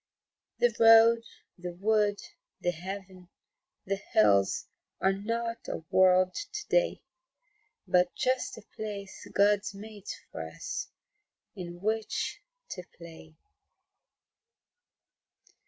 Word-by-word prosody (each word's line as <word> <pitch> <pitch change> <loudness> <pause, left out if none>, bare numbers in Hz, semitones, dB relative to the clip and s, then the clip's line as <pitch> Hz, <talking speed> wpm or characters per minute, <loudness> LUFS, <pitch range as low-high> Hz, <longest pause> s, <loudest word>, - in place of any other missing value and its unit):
The 485 0 +2
road, 225 0 +8 0.4
the 180 0 -5
wood, 210 +1 +2 0.4
the 175 - 0
heaven, 185 +1 -8 0.6
the 195 +1 -1 0.2
hills 100 -2 +4 0.3
Are 190 0 +3
not 230 +3 -2
a - - -4
World 185 0 +5
to 420 +1 -6
day - - +2 0.8
But 180 0 +3
just 255 0 0
a 225 - -11
place 205 -2 -6
God's 205 0 +2
made 210 0 -11 0.2
for - - -5
us - - -5 0.7
In 175 -2 -7
which 220 +1 -1 0.3
to 180 - -5
play. 160 -2 -12
200 Hz, 100 wpm, -29 LUFS, 180-225 Hz, 0.8 s, road